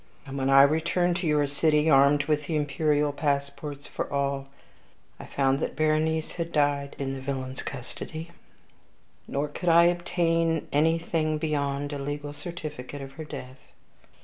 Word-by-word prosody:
And 135 -1 -7
when 135 -1 0
I 135 0 +8
returned 170 +4 +2
to 175 -2 -2
your 150 -1 +3
city, 150 +2 +2
armed 140 0 +5
with 150 0 0
the 160 - -1
imperial 150 0 +1
passports 140 0 -2
for - - -5
all, 140 -1 -1 0.7
I - - -8
found 135 0 +1
that - - -3
Berenice 155 +1 +1
had 170 -1 -3
died 145 -2 +1
in 135 -1 -3
the 135 - -6
villain's 130 -1 -4
custody; 155 +5 -7 1.0
nor 140 +2 -1
could 170 +4 -2
I 170 +1 +7
obtain 165 -2 +1
anything 160 +1 +1
beyond 145 -2 -1
a 145 - -4
legal 145 +1 -4
certificate 145 -5 -7
of 135 - -9
her 160 +3 -8
death. 130 -3 -8
145 Hz, 150 wpm, -27 LUFS, 140-160 Hz, 1.0 s, I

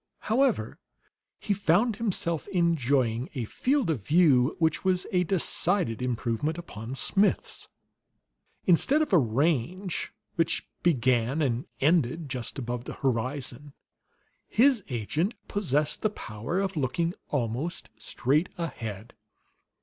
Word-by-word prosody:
However, 235 - +1 0.6
he 205 - -1
found 200 +4 +2
himself 185 -7 -1
enjoying 135 - +1
a 125 -4 -2
field 255 - +1
of 125 -11 -3
view 145 - +4
which 160 -3 +1
was 185 -1 +1
a 180 -1 +3
decided 180 - 0
improvement 125 +5 -1
upon 120 -7 -7
Smith's. 200 +8 0 1.0
Instead 270 - +4
of 300 - -5
a 180 - +8
range 155 - 0 0.3
which 165 0 0
began 130 -3 +2
and 125 -2 -1
ended 155 0 +2
just 125 -1 -4
above 120 -2 -4
the - - -6
horizon, 130 +2 -2 0.7
his 250 -2 +4
agent 150 - -1
possessed 150 -6 0
the 215 - +2
power 120 - -4
of 195 -1 -1
looking 155 +5 0 0.2
almost 130 +4 -2
straight 150 +7 +1
ahead. 115 - -5
150 Hz, 115 wpm, -28 LUFS, 125-180 Hz, 1.0 s, a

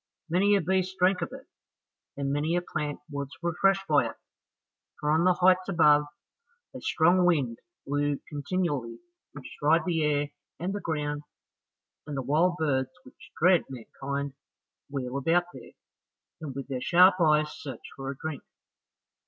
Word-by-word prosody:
Many 200 +4 +4
a 200 - +2
beast 190 0 0
drank 180 +1 +3
of - - -3
it, - - -10 0.7
and 140 0 -1
many 155 +4 0
a 175 - +1
plant 150 -4 -4
was 140 -2 -5
refreshed 195 +3 +2
by 150 -2 +3
it, - - -8 0.8
for 150 - 0
on 160 +3 +3
the 185 -1 +4
heights 185 +1 +3
above, 150 -4 +5 0.7
a - - -7
strong 175 +3 +3
wind 140 -10 +1 0.3
blew 145 0 0
continually, 145 -6 -2 0.4
which 145 -3 -10
dried 160 +4 +3
the 165 -3 0
air 145 -1 +1 0.3
and 185 +3 -2
the 205 - -4
ground, 150 -2 -2 0.9
and 145 -2 -4
the 135 - -2
wild 165 +7 +2
birds 135 -4 0
which 290 +2 -16
dread 175 +1 +4
mankind 135 +3 -5 0.6
wheel 135 -2 -3
about 165 +6 +2
there, - - -12 0.7
and 145 -4 -6
with 135 -1 -5
their 130 -2 -4
sharp 180 +4 +5
eyes 150 -1 +3
search 140 -3 -8
for 135 0 -6
a 135 - -5
drink. 155 -2 -5
150 Hz, 155 wpm, -28 LUFS, 140-180 Hz, 0.9 s, above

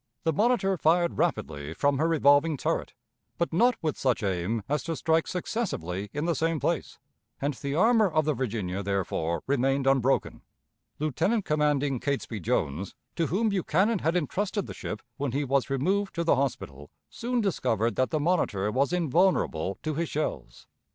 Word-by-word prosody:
The 160 - +1
Monitor 205 -1 +2
fired 170 +2 +2
rapidly 75 +1 -1
from 140 -1 +1
her 160 - +2
revolving 150 -1 +4
turret, - - -2 0.4
but 170 -1 -1
not 240 +8 +4
with 155 -2 -1
such 130 -4 +1
aim 95 +3 -1
as 150 0 0
to 165 - -2
strike 160 +1 +1
successively 105 - -3
in 145 +4 -3
the 170 - +2
same 165 +1 0
place, - - -2 0.4
and 145 +2 -1
the 140 +2 -4
armor 220 +3 +4
of 155 -2 +1
the 155 - +2
Virginia, 105 -7 -3
therefore, 90 -4 -1
remained 135 0 +1
unbroken. 135 -1 +1 0.6
Lieutenant 170 - 0
commanding 145 -3 +1
Catesby 135 -5 -2
Jones, 80 +1 -2 0.2
to 165 -2 0
whom 215 +5 +1
Buchanan 195 +2 +1
had 165 +2 0
intrusted 190 +5 -1
the - - -7
ship 105 - -6
when 140 -3 -2
he 145 +2 0
was 140 0 +1
removed 190 +9 0
to 170 - 0
the 165 - +4
hospital, 75 - -3 0.2
soon 245 +1 -2
discovered 120 - 0
that 130 - +1
the 155 - 0
Monitor 145 - +1
was 135 +6 +1
invulnerable 165 - +1
to 155 - -1
his 165 +2 -2
shells. 145 - -4
145 Hz, 165 wpm, -27 LUFS, 120-175 Hz, 0.6 s, revolving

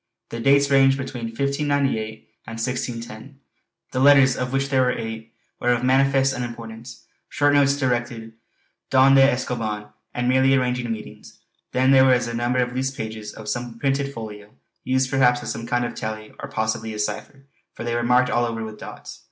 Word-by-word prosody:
The 115 - -6
dates 140 +3 +3
ranged 135 0 +5
between 130 -3 -5
1598 140 -3 -2 0.2
and 115 - -7
1610. 120 +1 -5 0.5
The 130 - -2
letters, 135 -1 +6
of 125 0 -3
which 135 0 -1
there 135 -2 +2
were 125 0 +1
eight, 115 0 -6 0.3
were 120 - 0
of 120 - -2
manifest 135 +1 +3
unimportance, 120 0 -8 0.2
short 145 0 +2
notes 140 -1 +3
directed: 120 -4 -2 0.6
"Don 130 +1 +5
de 135 - +7
Escoban" 120 -5 0 0.3
and 125 0 -1
merely 130 +1 +4
arranging 125 -2 -1
meetings. 110 -1 -9 0.3
Then 130 +1 +3
there 135 -1 +7
were 130 -1 +5
a 120 -1 -2
number 120 +2 -1
of 125 0 0
loose 130 +1 0
pages 110 -4 -6
of 110 - -11
some 120 0 -4
printed 140 +2 -1
folio, 105 -4 -9 0.3
used 130 0 0
perhaps 125 -3 +3
as - - -4
some 115 0 -6
kind 120 0 0
of 120 - -5
tally 110 0 -6
or - - -7
possibly 110 0 -2
a - - -6
cipher, 135 +6 -5 0.3
for - - -7
they 120 0 -2
were 120 - 0
marked 125 +1 +3
all 120 0 +2
over 115 -1 -4
with 110 -1 -8
dots. - - -10
125 Hz, 185 wpm, -23 LUFS, 115-135 Hz, 0.6 s, de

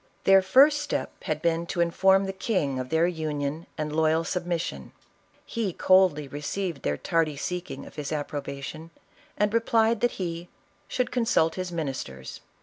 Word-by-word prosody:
Their 195 0 +6
first 275 +10 +5
step - - -2
had 155 +1 -2
been 170 0 +1
to 175 - -4
inform 190 +3 +4
the 195 - -3
king 185 - -1
of 130 0 -5
their 160 +1 +3
union 155 -2 -3
and 150 -1 -3
loyal 160 +1 +3
submission. 170 - -3 0.5
He 215 -6 -2
coldly 185 -7 +4
received 150 +3 -4
their 75 0 -1
tardy 160 - 0
seeking 175 -4 -5
of - - -14
his 145 -2 -4
approbation, 145 +1 -5 0.5
and 210 0 +1
replied 230 -1 +2
that 240 - +2
he 170 -2 -4 0.4
"should 250 - -1
consult 225 -10 +2
his 185 -1 -4
ministers." 135 - -5
165 Hz, 150 wpm, -26 LUFS, 150-190 Hz, 0.5 s, Their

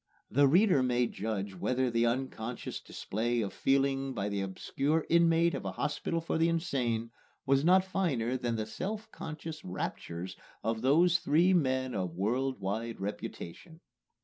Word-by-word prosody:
The 140 +4 +5
reader 180 0 +5
may 125 -1 +2
judge 105 -3 -3
whether 125 +7 0
the 115 0 +2
unconscious 120 -1 -3
display 120 +3 -2
of 100 - -3
feeling 135 -1 +1
by 105 -1 -1
the 100 -1 -1
obscure 140 +11 -1
inmate 170 0 +4
of - - -3
a - - -3
hospital 160 +3 -1
for 165 0 -2
the 165 +1 +4
insane 125 -9 -1 0.3
was 135 +1 +3
not 185 +3 +5
finer 140 -11 0
than 120 -2 -1
the 110 -1 -2
self 205 - -5
conscious 155 0 -7
raptures 90 0 -5 0.3
of 110 0 -1
these 165 +7 +4
three 170 +6 +4
men 130 -6 +1
of 90 -3 -2
world 125 +7 0
wide 110 +4 -3
reputation. 105 - -6
130 Hz, 150 wpm, -31 LUFS, 110-160 Hz, 0.3 s, The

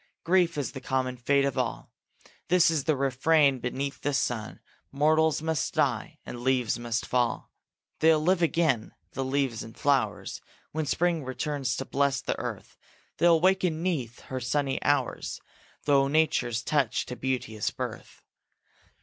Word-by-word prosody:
Grief 170 -2 +2
is 145 - -2
the 130 - -8
common 130 -1 -1
fate 140 +3 +2
of 140 - -1
all. - - -3 0.6
This 180 -1 +5
the 155 +2 +1
refrain 140 +1 +3
beneath 130 +2 -4
the 145 -1 0
sun: 110 -5 -2 0.3
Mortals 155 +2 +2
must 160 -3 -1
die, - - 0
and 120 - -7
leaves 125 -2 +1
must 120 -1 -2
fall. 120 -1 -1 0.5
They'll 160 0 +5
live 175 +3 +2
again, 160 -8 +1 0.2
the 135 - -3
leaves 130 -3 -1
and 110 0 -10
flowers, 120 -8 0 0.3
When 155 -1 -2
spring 170 +1 +1
returns 130 -1 -2
to 135 - -4
bless 140 0 +1
the - - -3
earth; - - -6 0.4
They'll 170 -1 +5
waken 180 -2 +2
'neath 130 -11 -2
her 130 - -5
sunny 135 +2 -1
hours 140 -4 0 0.4
Through 140 -1 +3
nature's 140 -6 +1
touch 135 -5 +1
to 125 - -6
beauteous 125 -5 -2
birth. - - -7
140 Hz, 145 wpm, -27 LUFS, 125-155 Hz, 0.6 s, This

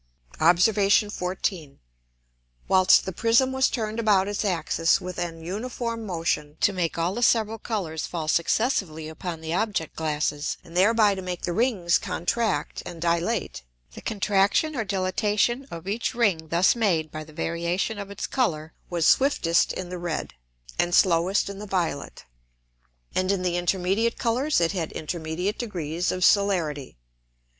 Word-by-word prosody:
Obs. 175 +4 +5
14. 195 -6 0 0.9
Whilst 185 -1 +5
the 190 - -3
Prism 230 +7 +2
was 265 0 +2
turn'd 220 -2 -3
about 205 -4 +3
its 205 +1 -2
Axis 170 -3 +1
with 180 -1 -6
an 165 -2 -4
uniform 230 +4 -4
Motion, 165 -4 -2
to 205 - +3
make 175 -3 -2
all 170 +2 0
the 240 - -4
several 225 -2 +2
Colours 175 -10 -3
fall 165 -3 -4
successively 170 - 0
upon 160 +1 -6
the 160 0 -4
Object 200 -5 -1
glasses, 150 -1 -2
and 165 - -14
thereby 210 +2 +4
to 190 - -5
make 180 -1 -5
the 175 - -1
Rings 195 -6 +2
contract 200 +5 -1
and 175 -2 -8
dilate: 170 - -1 0.3
The - - -10
Contraction 205 +8 +1
or 230 - -1
Dilatation 210 +6 0
of 170 +2 -8
each 220 +4 -2
Ring 195 -9 +1
thus 170 +7 +3
made 175 -9 +1
by 155 0 -6
the 155 - -15
variation 170 +7 -2
of 200 -1 -6
its 200 - -5
Colour 160 - -1 0.2
was 170 -3 0
swiftest 220 -12 +3
in 180 -1 -5
the 180 0 -5
red, 170 -2 -4 0.5
and 175 0 +2
slowest 180 +2 +3
in 200 0 -7
the 210 - -7
violet, 170 - -3 0.9
and 185 +1 +1
in 190 -2 -1
the 180 -1 0
intermediate 190 +6 0
Colours 255 +6 +1
it 170 -1 +2
had 175 -5 -3
intermediate 165 +5 -3
degrees 175 -6 -2
of 185 0 +1
Celerity. 165 - +1
185 Hz, 155 wpm, -25 LUFS, 165-210 Hz, 0.9 s, Obs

